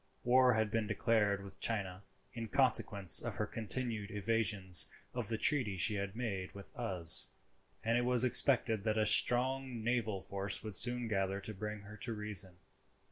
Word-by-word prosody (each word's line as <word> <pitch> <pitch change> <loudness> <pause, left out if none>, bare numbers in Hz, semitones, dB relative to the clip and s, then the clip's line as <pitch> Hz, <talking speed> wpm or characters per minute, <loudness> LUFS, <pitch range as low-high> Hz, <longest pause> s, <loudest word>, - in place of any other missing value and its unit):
War 125 0 +3
had 110 -1 -2
been 110 -1 -2
declared 105 -2 -1
with 95 -1 -12
China 95 -5 -3 0.3
in 115 -1 -7
consequence 105 -7 +3
of - - -6
her - - -3
continued 115 -1 -4
evasions 105 -3 +1 0.2
of - - -5
the 115 - -1
treaty 115 -7 0
she 105 +5 +2
had 100 0 -5
made 100 -6 -6
with 100 -1 -12
us, 95 -8 +6 0.5
and 115 +2 0
it - - -2
was 125 -1 +4
expected 120 -4 +2
that 110 0 -2
a 110 - +1
strong 125 +1 +2
naval 115 -4 -2
force 100 +1 -3
would 110 -3 -8
soon 120 -1 -1
gather 95 -2 -3
to 110 - -6
bring 105 +1 -7
her 105 +1 -13
to 120 -1 -3
reason. 100 -4 -1
110 Hz, 170 wpm, -33 LUFS, 100-120 Hz, 0.5 s, us